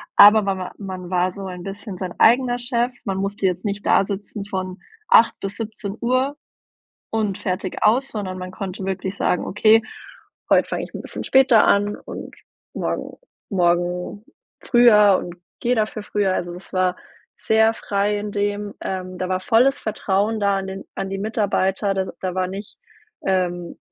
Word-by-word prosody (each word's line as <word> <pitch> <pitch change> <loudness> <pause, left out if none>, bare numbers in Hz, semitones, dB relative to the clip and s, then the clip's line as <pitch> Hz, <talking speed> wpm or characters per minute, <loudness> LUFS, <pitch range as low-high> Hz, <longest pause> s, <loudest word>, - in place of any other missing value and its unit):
Aber 210 +1 +9
mawa 190 -2 -3
man 185 -3 -7
war 180 0 +1
so 195 0 -7
ein 180 -1 -7
bisschen 195 0 -7
sein 180 -1 -5
eigener 245 +1 +4
Chef. 240 0 0
Man 195 -3 -2
musste 195 +1 -2
jetzt 185 -1 0
nicht 205 0 -3
dasitzen 200 +1 0
von 185 -2 -4 0.3
8:00 225 - +5
bis 195 0 -5
17:00 235 +5 -2 0.7
und 210 -3 -1
fertig 185 -2 -3
aus, 250 +6 +3
sondern 190 -4 -4
man 185 0 -6
konnte 190 0 -6
wirklich 190 0 -3
sagen: 180 - 0
„Okay, 220 +2 +4 0.7
heut - - +4
fange - - -3
ich - - -9
'n - - -5
bisschen - - -7
später 265 -4 +5
an 205 +1 +2
und - - -8 0.4
morgen - - -3 0.3
morgen 180 +1 0 0.4
früher 210 -5 +6
und 175 -1 -8 0.2
gehe 245 +1 +1
dafür 215 -1 -1
früher.“ 205 -2 0
Also 175 0 -3
das 180 +2 -12
war 185 -1 +1 0.4
sehr 220 0 +3
frei 205 -1 -1
in 205 0 -5
dem, 205 0 -2
ähm 185 -1 -4
da 185 - -2
war 185 0 -1
volles 250 +7 +3
Vertrauen 215 -1 -1
da 200 -1 +2
an 195 0 -3
den 190 0 -7
an 195 - -3
die 195 - -3
Mitarbeiter, 200 -1 0
da 190 0 0 0.2
da 185 -1 -2
war 185 -1 0
nicht, 195 +2 -8 0.5
ähm 175 -2 -1
200 Hz, 165 wpm, -22 LUFS, 185-215 Hz, 0.7 s, Aber